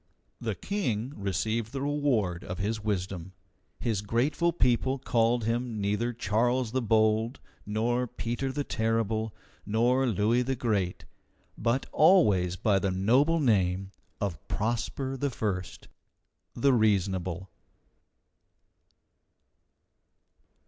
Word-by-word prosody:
The - - -2
King 130 - -2
received 110 +3 -2
the 135 - -3
reward 125 -12 0
of 90 - -5
his 105 +2 -2
wisdom. 95 -3 -3 0.5
His 110 -4 -1
grateful 130 +11 +1
people 130 -3 +1
called 120 -2 +1
him 115 0 -1
neither 105 +4 0
Charles 120 +2 0
the 130 +1 0
Bold, 110 +2 +2 0.3
nor 120 +4 0
Peter 120 +4 -3
the 145 +2 -2
Terrible, 110 -2 -1 0.3
nor 120 +5 +2
Louis 110 +3 +2
the 130 +2 -1
Great, 105 -7 -1 0.5
but 120 +4 0
always 105 - +4
by 100 0 +2
the 100 - 0
noble 125 - +3
name 95 - +1 0.3
of 95 -7 -2
Prosper 120 +4 -2
I, 105 -10 -2 0.8
the 135 +3 +3
Reasonable. 95 -4 0
115 Hz, 105 wpm, -28 LUFS, 100-125 Hz, 0.8 s, always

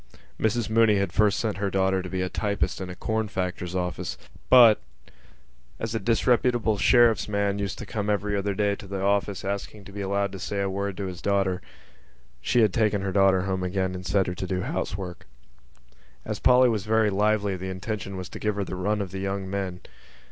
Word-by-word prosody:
Mrs 110 0 +1
Mooney 110 -1 +4
had 100 -3 -1
first 105 +1 +3
sent 110 -3 -1
her 100 0 -1
daughter 95 0 +1
to 90 - -7
be 95 0 -2
a - - -1
typist 100 0 -2
in 95 - -5
a 90 - -7
corn 110 +3 -1
factor's 90 -2 -3
office 90 -1 -3 0.3
but, 120 - +8 1.0
as 115 0 -3
a 115 - 0
disreputable 115 0 +2
sheriff's 120 +2 +4
man 100 -1 0
used 100 -1 -3
to - - -7
come 105 -1 -3
every 105 0 0
other 100 0 -1
day 100 0 +1
to 100 - -11
the 95 0 -4
office, 100 0 0
asking 100 +1 -4
to - - -11
be 100 +1 -6
allowed 100 0 0
to 95 - -8
say 100 - -3
a 100 -1 0
word 100 0 -3
to 100 - -3
his 90 -2 -6
daughter, 95 -2 +1 0.8
she 120 - +2
had 105 -4 +3
taken 105 -3 +1
her 95 - -1
daughter 95 -1 +4
home 95 0 -2
again 95 0 -1
and 90 0 -6
set 100 -2 +2
her 90 - -3
to 95 +1 -5
do 90 -1 -1
housework. 90 -5 -4 1.0
As - - -4
Polly 125 0 +6
was 110 -5 0
very 110 -1 +2
lively 105 0 +1
the 95 +1 -5
intention 95 +1 -5
was 90 -1 -5
to - - -8
give 105 -1 -1
her 100 - -1
the 95 - -5
run 105 +3 0
of 95 -3 -5
the 95 - -5
young 95 0 -3
men. 95 -2 -4
100 Hz, 215 wpm, -26 LUFS, 95-105 Hz, 1.0 s, but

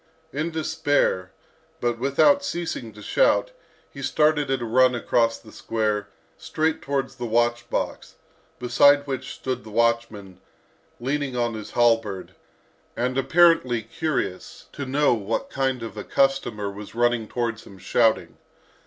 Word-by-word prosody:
In 155 +4 -1
despair, 145 - 0 0.5
but 120 -1 -1
without 210 - +3
ceasing 170 - -4
to 105 0 -12
shout, - - +2 0.4
he 140 - -9
started 150 +2 +2
at 135 -1 +1
a 120 - -4
run 125 +2 +4
across 115 -1 +1
the 110 - -16
square, 105 -2 -2 0.3
straight 160 -1 -1
towards 135 -1 -3
the 120 - -4
watch 120 +1 +1
box, - - -3 0.4
beside 140 +4 +4
which 135 -2 -4
stood 130 -1 -4
the 110 - -11
watchman, 115 -4 -1 0.6
leaning 135 +1 -2
on 120 -1 0
his 110 -1 -8
halberd, 115 -5 +1 0.6
and 125 +1 -1
apparently 135 -5 +3
curious 115 - -4
to 140 - -6
know 145 +1 +3
what 110 -1 -3
kind 130 -3 -1
of 115 - -7
a 105 - -6
customer 130 -7 0
was 105 +2 -10
running 120 -2 +1
towards 115 -2 -3
him 95 - -13
shouting. 95 -1 +1
120 Hz, 140 wpm, -24 LUFS, 115-140 Hz, 0.6 s, run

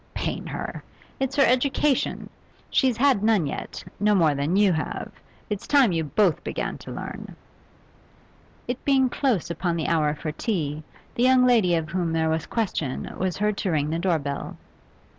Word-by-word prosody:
'Pain - - -3
her! - - -5 0.4
It's 270 0 -1
her 280 - +5
education. 265 +2 +1 0.4
She's 255 -4 +2
had 260 -4 +3
none 215 -7 +3
yet, - - -5 0.2
no 210 +1 +3
more 160 -5 +4
than 145 +5 -1
you 200 -2 +4
have. 155 - -4 0.4
It's 210 -2 -4
time 275 -7 +5
you 165 -2 0
both 175 +3 +1
began - - -4
to - - -9
learn.' - - -7 1.3
It 245 +1 -4
being 265 -2 +3
close 240 - 0
upon 170 +1 -1
the 160 -3 -2
hour 155 -2 +1
for 155 +1 -4
tea, 155 -5 -2 0.3
the - - -3
young 255 0 +5
lady 220 -8 +4
of 160 -1 -2
whom 170 -2 -1
there 160 0 +1
was 160 -1 -1
question 180 - -2
was 185 -1 -1
heard 210 0 0
to 190 - -1
ring 150 -2 0
the 165 - -1
door 175 -2 +2
bell. 140 -1 -5
185 Hz, 175 wpm, -25 LUFS, 160-245 Hz, 1.3 s, her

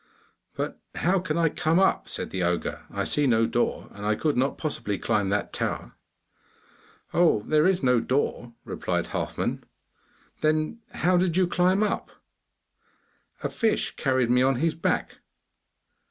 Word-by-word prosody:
'But - - -4 0.2
how 185 +3 +2
can 170 -3 -2
I 165 -1 +3
come 160 +2 +1
up?' 190 0 +2
said - - -4
the 95 - -2
ogre, 90 0 -2
'I - - -2
see 145 -1 +2
no 115 -2 +4
door, - - -1
and 100 - -10
I 105 +1 +1
could 150 +5 0
not 135 +3 +1
possibly 105 -10 -2
climb 100 0 0
that 100 +1 -1
tower.' - - -3 1.2
'Oh, 165 -11 +3
there 155 +6 +3
is 185 -5 +1
no 125 -2 +4
door,' 120 -1 -1
replied - - -2
Halfman. - - -2 0.8
'Then 155 +7 +1
how 180 +1 +2
did 175 -1 +1
you 185 - +4
climb 180 +3 +2
up?' 210 - -1 1.3
'A - - 0
fish 225 -2 0
carried 130 -4 +1
me 125 0 +4
on 135 +1 +3
his 160 +5 +1
back. 165 - -1
150 Hz, 155 wpm, -26 LUFS, 120-175 Hz, 1.3 s, no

